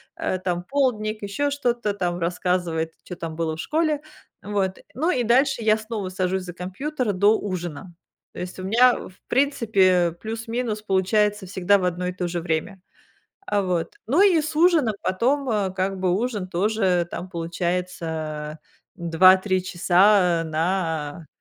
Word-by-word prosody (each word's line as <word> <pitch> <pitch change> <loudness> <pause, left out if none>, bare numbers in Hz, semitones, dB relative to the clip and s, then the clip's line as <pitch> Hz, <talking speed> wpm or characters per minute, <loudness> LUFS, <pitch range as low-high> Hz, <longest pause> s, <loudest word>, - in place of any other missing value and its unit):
э, 185 - -2
там, 175 -1 -2
полдник, 220 -6 0
ещё 285 +9 -1
что-то 240 -6 -1
там, 175 -3 -2
рассказывает, 170 -2 -1
чё 180 - -8
там 165 -1 -5
было 160 -1 -2
в - - -11
школе, 305 - 0 0.4
вот. 195 -2 -2
Ну, 315 - 0
и 250 -8 0
дальше 260 +2 +3
я 215 -1 +4
снова 215 -3 -5
сажусь 185 0 -1
за 175 -1 -7
компьютер, 230 - -3
до 205 +4 +4
ужина. 175 -3 -5 0.4
То - - -9
есть 180 +1 -6
у - - -6
меня, 240 +5 +5
в 185 - -17
принципе, 200 -10 +3
плюс-минус 225 0 -3
получается 210 +1 +1
всегда 190 +1 +2
в 190 - -4
одно 180 0 -1
и 180 - -3
то 180 -1 -3
же 175 - -2
время. 170 +4 -2 0.7
А, 205 - 0
вот, 180 -3 -2
ну, 295 - +4
и 365 -6 +5
с 315 0 -4
ужина 320 -9 +4
потом, 260 +8 0
э, 200 -4 0
как 190 0 -1
бы 185 -1 +1
ужин 210 -2 -2
тоже 185 -2 +1
там 185 - -6
получается 165 -3 -3 0.3
2-3 185 +3 +4
часа 180 -1 +3
на, 160 -1 -2
190 Hz, 155 wpm, -23 LUFS, 175-225 Hz, 0.7 s, меня